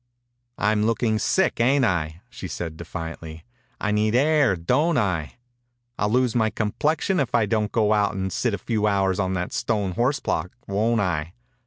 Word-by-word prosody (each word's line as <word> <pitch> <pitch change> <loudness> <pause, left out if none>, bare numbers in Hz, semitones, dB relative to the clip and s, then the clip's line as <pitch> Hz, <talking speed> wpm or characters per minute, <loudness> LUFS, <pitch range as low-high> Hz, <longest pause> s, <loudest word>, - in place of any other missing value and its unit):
"I'm 105 +1 +2
looking 115 -1 +1
sick, 190 - +1
ain't 130 +3 +3
I?" 85 -4 -1
she 115 -6 -8
said, 85 -3 -5
defiantly. 80 0 -7 0.3
«I 105 - -1
need 105 +1 +1
air, 145 -5 +3
don't 130 - +1
I? 90 -10 -1 0.6
I'll 105 - +1
lose 125 0 +2
my 110 -2 +3
com 105 0 -2
plexion 160 +3 +1
if 125 -3 -1
I 115 -2 +3
don't 105 0 0
go 110 -2 +2
out 105 -1 +1
and 95 -1 -3
sit 120 -5 0
a - - -6
few 105 +1 -1
hours 95 -2 +1
on 95 -1 0
that 90 0 -3
stone 105 -4 -1
horse 125 +9 0
block, 85 +3 -2
won't 110 +3 +1
I? 85 -3 -2
105 Hz, 180 wpm, -24 LUFS, 95-120 Hz, 0.6 s, ain't